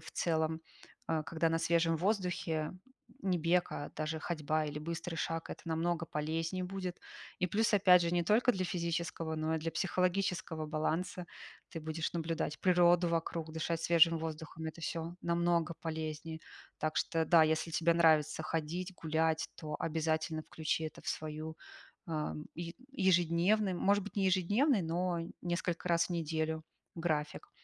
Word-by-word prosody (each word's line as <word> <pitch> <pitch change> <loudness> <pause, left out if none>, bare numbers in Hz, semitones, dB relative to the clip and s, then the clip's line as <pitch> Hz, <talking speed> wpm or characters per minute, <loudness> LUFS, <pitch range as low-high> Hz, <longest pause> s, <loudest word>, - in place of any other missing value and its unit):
в 160 - -11
целом, 160 -1 0 0.5
а, 160 -1 0
когда 165 +2 0
на 165 - +1
свежем 165 0 +2
воздухе 175 -4 0 0.5
не 185 -2 +1
бег, 175 +2 +2
а 145 - -5
даже 155 +1 -2
ходьба, 155 -2 -1
или 150 0 -4
быстрый 165 +2 -4
шаг, 165 0 -2
это - - -7
намного 165 0 -1
полезнее 165 +5 -2
будет. 185 -1 -4 0.4
И 180 - +3
плюс 215 +6 +1
опять 180 -3 +7
же 170 - 0
не 175 - +3
только 225 +8 +4
для 185 -3 -1
физического, 170 -2 -2
но 155 +1 0
и - - -1
для 165 +1 -3
психологического 180 -2 0
баланса, 160 +4 -2 0.4
ты 165 - -5
будешь 160 +1 -3
наблюдать 165 -2 -2
природу 175 -1 +5
вокруг, 165 -1 -2
дышать 160 +1 -1
свежим 165 -1 +5
воздухом- 160 0 -5
это 160 +1 -6
всё 165 +2 -3
намного 170 -1 +1
полезнее. 160 0 -4 0.4
Так 155 0 -1
что 165 -1 +1
да, 165 0 +6
если 160 +1 +1
тебе 165 +1 +3
нравится 160 -2 +4
ходить, 170 +4 -3
гулять, 160 -1 0
то 150 -1 -6
обязательно 160 0 0
включи 160 0 -2
это 155 - -6
в - - -6
свою, 155 +1 -4 0.5
а, 155 -2 -2 0.2
еж 170 0 -5 0.2
ежедневную, 185 0 +3
может 200 0 +3
быть, 205 - -9
не 195 -1 +2
ежедневный, 205 - +3
но 170 +1 0 0.2
несколько 175 0 -2
раз 170 -1 +3
в - - -13
неделю, 160 -1 -1 0.3
график. 155 -3 -2
165 Hz, 155 wpm, -34 LUFS, 160-175 Hz, 0.5 s, опять